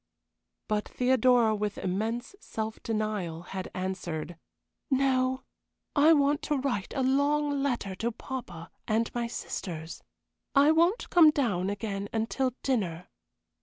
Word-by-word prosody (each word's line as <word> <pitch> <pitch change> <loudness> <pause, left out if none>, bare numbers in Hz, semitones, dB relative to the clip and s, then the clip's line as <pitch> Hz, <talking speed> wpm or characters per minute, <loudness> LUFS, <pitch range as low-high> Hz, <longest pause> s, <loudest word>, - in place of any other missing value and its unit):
But 210 -1 -1
Theodora, 250 -3 +3
with 210 -1 -2
immense 220 - -2
self 220 - -5
denial, 210 -7 -2
had 190 +1 -6
answered: 180 -3 -4 0.5
"No, 260 -1 +2 0.5
I 295 +3 +6
want 290 -1 +3
to 295 - 0
write 255 -8 -2
a 265 - +1
long 285 +2 +2
letter 245 -8 -1
to 235 +3 -1
papa 220 -10 -7 0.2
and 225 +1 0
my 240 -1 -1
sisters. 165 -7 -6 0.5
I 285 +2 +6
won't 340 +7 +2
come 335 -3 +8
down 210 -11 0
again 205 -1 -3
until 235 +3 -1
dinner." 180 -10 -1
230 Hz, 125 wpm, -29 LUFS, 195-275 Hz, 0.5 s, come